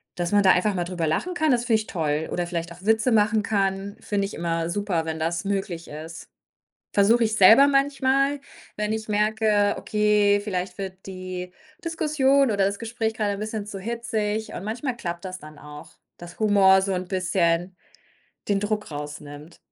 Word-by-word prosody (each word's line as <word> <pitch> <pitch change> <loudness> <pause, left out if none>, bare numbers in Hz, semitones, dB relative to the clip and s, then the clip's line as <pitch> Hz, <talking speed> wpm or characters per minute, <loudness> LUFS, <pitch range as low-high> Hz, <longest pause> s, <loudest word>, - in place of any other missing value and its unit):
dass 175 -1 -2
man 205 0 +4
da 190 - +7
einfach 200 +3 +2
mal 175 - 0
drüber 175 -2 -2
lachen 250 - -1
kann, 315 -2 +1
das 240 -1 +1
finde 225 -3 +2
ich 215 - -11
toll. 155 -3 -2
Oder 175 - -1
vielleicht 170 -1 -4
auch 175 +2 -16
Witze 220 +3 +3
machen 215 0 +3
kann, 195 -1 -1
finde 200 -1 -1
ich - - -9
immer 165 0 -2
super, 185 -3 -1
wenn 160 0 -3
das 165 +1 -1
möglich 195 -4 -3
ist. 160 +2 -9 0.7
Versuche 225 +4 +4
ich 220 0 -1
selber 225 +8 +8
manchmal, 275 0 +2 0.4
wenn 210 0 -1
ich 220 0 -4
merke: 210 -1 +2
„Okay, 210 -1 +2
vielleicht 185 -3 -3
wird 190 -1 -7
die 185 -1 -6 0.3
Diskussion 295 -4 +2
oder 200 -1 +2
das 200 +1 -2
Gespräch 225 -1 -2
grade 210 -2 0
'n 200 - -6
bisschen 215 -1 -4
zu 200 -2 -7
hitzig.“ 220 0 -3
Und - - -6
manchmal 240 +4 -3
klappt 175 -4 -5
das 185 0 -5
dann 155 -2 -13
auch, 150 0 -12 0.2
dass 175 0 -12
Humor 195 -3 +5
so 195 0 -1
'n 185 0 -3
bisschen 180 -1 0 0.7
den 200 -1 +1
Druck 210 -1 -2
rausnimmt. 145 +1 -8
200 Hz, 185 wpm, -24 LUFS, 175-220 Hz, 0.7 s, selber